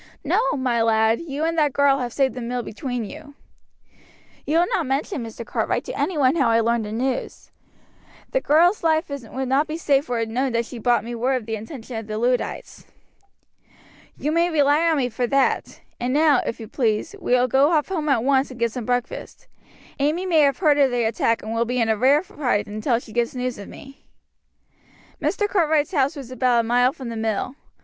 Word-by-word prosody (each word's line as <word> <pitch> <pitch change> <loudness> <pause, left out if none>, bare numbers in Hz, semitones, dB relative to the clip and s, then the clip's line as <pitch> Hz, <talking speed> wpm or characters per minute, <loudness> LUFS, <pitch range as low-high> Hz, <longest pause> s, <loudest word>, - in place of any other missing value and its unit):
No, 480 - +1
my 255 -5 0
lad, 225 +1 +2
you 300 -2 -4
and 330 0 0
that 295 -3 +2
girl 280 -1 +3
have 245 -2 -3
saved 265 +1 +1
the 250 - -6
mill 245 +1 -3
between 245 +1 -4
you." 285 +5 -11 1.1
"You 310 - +2
will 345 - +4
not 345 -4 -1
mention, 275 - -2
Mr. 230 +1 -8
Cartwright, - - -1
to - - -5
any 365 - -2
one 270 0 +3
how 270 -6 +3
I 230 0 +4
learned 230 -1 +1
the 210 - -6
news. 250 +3 -3 0.8
The - - +1
girl's 345 +7 +3
life 315 -1 +1
would 265 -1 -5
not 275 +4 +2
be 310 0 -4
safe 285 -3 +1
were 245 - 0
it 230 -1 -1
known 255 +2 -1
that 235 0 0
she 240 0 -9
brought 240 -2 +2
me 235 +1 -6
word 250 +3 0
of 250 -4 -3
the 225 0 -3
intention 225 +2 -8
of 220 -1 -6
the 215 0 -4
Luddites." 245 +2 -2 1.3
"You 300 - -2
may 335 +2 +2
rely 300 +1 +3
on 320 - +2
me 255 -3 +1
for 245 +2 -2
that; 275 +1 0 0.2
and 245 +1 -1
now, 295 -1 +4
if 230 - -4
you 220 - -8
please, 230 - -1
we - - 0
will 250 0 +4
go 270 +4 +4
off 310 -1 +1
home 315 -5 -2
at 235 -5 +2
once 270 0 +2
and 255 -2 -11
get 235 -1 +1
some 240 0 -5
breakfast. 245 +1 -3 0.5
Amy 305 +6 0
may 340 -4 +3
have 280 -3 +3
heard 300 -5 +3
of 275 -2 +5
the 245 -1 0
attack 225 0 0
and 220 +1 -4
will 230 0 +1
be 250 +2 -1
in 225 -1 +1
a 220 - +3
rare 275 - +3
fright 280 - -1
until 215 +4 -1
she 230 -2 -10
gets 240 +1 -1
news 250 -3 -3
of 200 - -9
me." 275 0 -13 1.2
Mr. 415 - 0
Cartwright's 320 -4 +1
house 280 0 +1
was 270 -4 -9
about 250 -2 +2
a 225 - -6
mile 245 +2 +3
from 260 -3 -8
the 230 - -5
mill. 220 +2 -2
255 Hz, 220 wpm, -22 LUFS, 235-295 Hz, 1.3 s, of